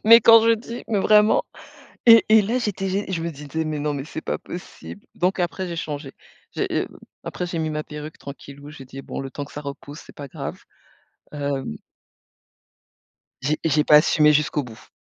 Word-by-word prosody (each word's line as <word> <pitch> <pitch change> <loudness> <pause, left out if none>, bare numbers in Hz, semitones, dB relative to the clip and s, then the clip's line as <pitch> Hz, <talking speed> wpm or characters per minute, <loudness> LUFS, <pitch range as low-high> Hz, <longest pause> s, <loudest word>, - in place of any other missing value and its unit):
mais 230 +1 +9
quand 230 -1 +8
je 230 - +5
dis, 235 +2 -8
mais 210 -3 +1
vraiment 210 +1 +5 0.6
et 230 -1 +9
et 215 -1 +6
là 235 +5 0
j'étais 200 -4 -2
gé 195 +2 -1
je 165 -2 -2
me 170 - -2
disais: 150 +2 -5
«Mais 155 -1 -3
non 145 0 -1
mais 135 -1 -4
c'est 155 - -7
pas - - -3
possible», 180 +3 -10
donc 185 +2 0
après 180 +1 -2
j'ai 170 - -5
changé, 145 -3 -5 0.4
j'ai, - - -1
heu, - - -1 0.4
après 180 - -4
j'ai 170 -1 -4
mis 155 -1 -2
ma 150 0 -3
perruque 150 +1 -9
tranquillou, 140 +1 -11
j'ai 140 -3 -11
dit: 135 +1 -10
«Bon - - -7
le 135 -1 -6
temps 145 - -5
que - - -16
ça 145 - -6
repousse 140 +1 -8
c'est - - -15
pas 145 - -8
grave». - - -6 0.8
Hem 140 - -3 1.7
J'ai 150 +3 0
j'ai 150 -2 +2
pas 150 - +7
assumé 150 0 +5
jusqu'au 150 -1 +1
bout. 115 -3 -13
155 Hz, 200 wpm, -23 LUFS, 145-190 Hz, 1.7 s, mais